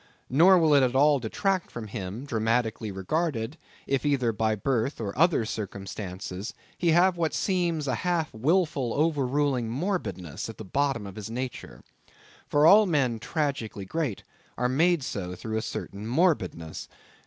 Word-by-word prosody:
Nor 175 +8 +7
will 160 -3 +4
it 140 - +6
at 130 -1 +1
all 145 +1 +5
detract 185 - -1
from 120 -2 -7
him, 105 +3 -6
dramatically 115 -3 0
regarded, 130 - -2 0.3
if 135 -1 0
either 135 -5 +2
by 110 0 0
birth 125 +4 -1
or 100 -3 -4
other 160 -6 +3
circumstances, 100 -2 -6 0.2
he 175 - 0
have 175 +2 +4
what 165 -2 0
seems 170 -6 0
a 130 - +1
half 175 -3 0
wilful 140 -1 +1
overruling 140 -5 +1
morbidness 125 - -3
at 115 - -8
the 110 - -8
bottom 135 0 0
of 100 0 -9
his 105 0 -6
nature. 120 - -6 0.6
For 145 +1 +3
all 205 +5 +8
men 130 -9 +1
tragically 135 - -3
great 140 -1 -3 0.3
are 125 - +1
made 160 +4 +2
so 90 -6 -4
through 110 +4 -4
a - - 0
certain 105 -2 -6
morbidness. 115 - 0
130 Hz, 155 wpm, -27 LUFS, 110-160 Hz, 0.6 s, all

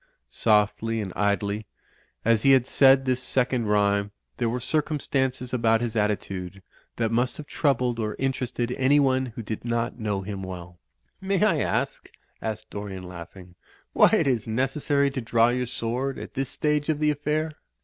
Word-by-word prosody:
Softly 110 - +2
and 100 -4 -4
idly 100 +1 0 0.6
as 115 -1 +4
he 135 +2 +6
had 130 -2 +4
said 135 0 +5
this 130 -1 +1
second 125 -2 0
rh)rme, 100 -1 +2 0.3
there 120 -2 0
were 125 +2 -2
circumstances 130 -3 -1
about 115 -2 +3
his 115 -1 -3
attitude 100 -3 -2 0.3
that 115 -1 0
must; 120 +2 0
have 150 - -7
troubled 125 -5 0
or 110 -1 -2
interested 125 -2 -2
anyone 130 -1 +3
who 115 -1 -7
did 110 0 -5
not 120 +1 -2
know 105 -3 -1
■y - - -10
him 100 -1 -5
wrell. 90 -2 -8 0.4
■^ - - -8
"May 195 +1 +2
I 170 -8 +2
ask," - - -1 0.3
asked 110 -1 -5
Dorian, 100 -2 -6
laughing, 90 +1 -10 0.4
"why - - +6
it - - +3
is 120 -6 0
i> - - -3
necessary 140 +3 +1
to 135 - -3
draw 115 0 +3
your 125 0 -1
sword 125 +3 -2
at - - -8
this 135 0 -2
stage 150 0 0
of 155 - +2
the.; 150 0 +2
affair?" 150 +2 -1
120 Hz, 175 wpm, -25 LUFS, 105-135 Hz, 0.6 s, he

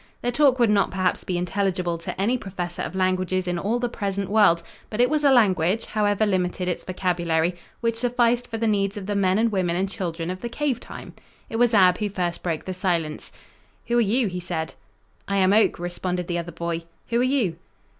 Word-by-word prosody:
Their 245 - +1
talk 270 0 +4
would 235 -4 +4
not 200 -2 +3
perhaps 185 0 0
be 180 - -2
intelligible 180 -1 -1
to 170 - -6
any 220 +6 +2
professor 180 -6 -5
of - - -4
languages 185 0 0
in 175 -1 -1
all 215 +7 0
the 245 0 -1
present 200 -4 -3
world, 205 -6 +4 0.3
but 215 - -5
it 245 +3 +4
was 305 -1 +1
a 285 - +6
language, 205 -4 +3
however 210 0 +1
limited 180 -2 -1
its 180 - -2
vocabulary, 175 -2 0 0.3
which 230 -1 0
sufficed 245 0 +2
for 225 - -4
the 225 - -1
needs 200 -2 +1
of 200 - -5
the 205 - -2
men 190 -1 +2
and 225 +1 +2
women 180 -4 0
and 190 +2 0
children 170 -4 -3
of 185 - -7
the 235 - -4
cave 270 -1 -1
time. - - -10 0.4
It 225 - -2
was 240 -1 +3
Ab 185 -3 +5
who 210 -1 -1
first 175 -3 -2
broke 165 -3 -3
the 185 - -3
silence: 170 -4 -2 0.6
"Who 240 0 +3
are - - +5
you?" 235 +4 +2
he 180 -1 -4
said. 165 -2 -4 0.5
"I 200 - 0
am 190 0 +4
Oak," 220 +1 +4
responded 180 +1 -3
the 175 0 -2
other 170 0 -6
boy. 170 0 -3 0.3
"Who 235 0 +1
are - - +3
you?" 250 -11 +1
190 Hz, 215 wpm, -24 LUFS, 180-225 Hz, 0.6 s, a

